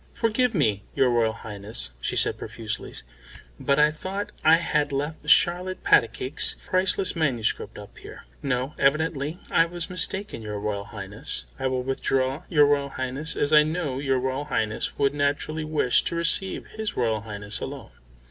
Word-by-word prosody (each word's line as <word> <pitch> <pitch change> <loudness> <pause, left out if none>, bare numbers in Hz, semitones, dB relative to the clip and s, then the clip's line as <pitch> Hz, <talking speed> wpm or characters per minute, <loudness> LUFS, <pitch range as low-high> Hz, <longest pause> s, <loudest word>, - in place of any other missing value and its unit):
"Forgive 230 +1 +1
me, 105 - +1
your 130 -2 +3
Royal 115 -2 +2
Highness," 105 - -1
she - - -1
said - - +2
profusely, - - -5 0.7
"but 140 - +1
I 150 0 +5
thought 190 +6 -5
I 160 +1 +7
had 150 -3 0
left 150 +2 -3
Charlotte 180 +4 +3
Patacake's 120 +3 +3
priceless 185 0 +1
manuscript 130 -9 -1
up - - -11
here. - - -11 0.2
No; 130 +1 -1
evidently 150 +2 +1
I 165 - +4
was 175 0 -4
mistaken, 185 - -2
your 105 -1 -5
Royal 100 -1 -3
Highness. 100 0 -4
I 130 - 0
will 130 -1 -1
withdraw, 135 +3 -1
your 150 -4 +5
Royal 140 -1 +1
Highness, 135 +4 -2
as 145 +1 0
I 150 - +9
know 155 -4 -2
your 135 -2 +1
Royal 130 +3 -2
Highness 110 -7 -2
would 140 -1 +2
naturally 145 +2 -1
wish 155 -5 +2
to - - -1
receive 170 +3 0
his 220 0 -5
Royal 115 -3 +1
Highness 105 -1 -4
alone." - - -7
140 Hz, 160 wpm, -25 LUFS, 125-165 Hz, 0.7 s, I